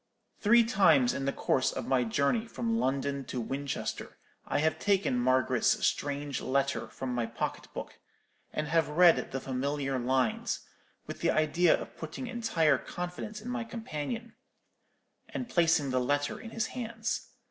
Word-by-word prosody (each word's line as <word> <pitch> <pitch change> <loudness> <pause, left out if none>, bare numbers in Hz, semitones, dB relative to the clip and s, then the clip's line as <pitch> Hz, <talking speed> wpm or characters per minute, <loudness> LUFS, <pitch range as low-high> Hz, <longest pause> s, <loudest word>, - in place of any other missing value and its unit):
"Three 235 +3 +6
times 165 - +4
in 135 - -3
the 140 - +1
course 130 - +1
of - - -4
my 130 -2 +2
journey 140 - +1
from 230 0 -1
London 140 -3 0
to 125 - -4
Winchester 135 +4 -4 0.3
I - - 0
have 155 +2 +1
taken 195 -9 +2
Margaret's 130 +1 +2
strange 145 -1 -1
letter 140 +1 0
from 130 -1 -5
my 120 -2 -1
pocket 115 - -4
book, - - -7 0.5
and 150 - -2
have 165 0 +2
read 170 +2 +5
the 135 - -2
familiar 135 +1 -2
lines, 125 -1 0 0.4
with - - -7
the - - +2
idea 160 +3 +3
of - - -9
putting 160 +10 -6
entire 230 -11 +2
confidence 180 +5 -6
in 235 - -7
my 250 -2 -2
companion, 230 +1 -5 1.0
and 250 - -4
placing 165 - +3
the 130 0 +2
letter 145 +3 0
in 225 - -8
his 225 -1 -1
hands. 230 -2 -3
150 Hz, 155 wpm, -30 LUFS, 135-215 Hz, 1.0 s, Three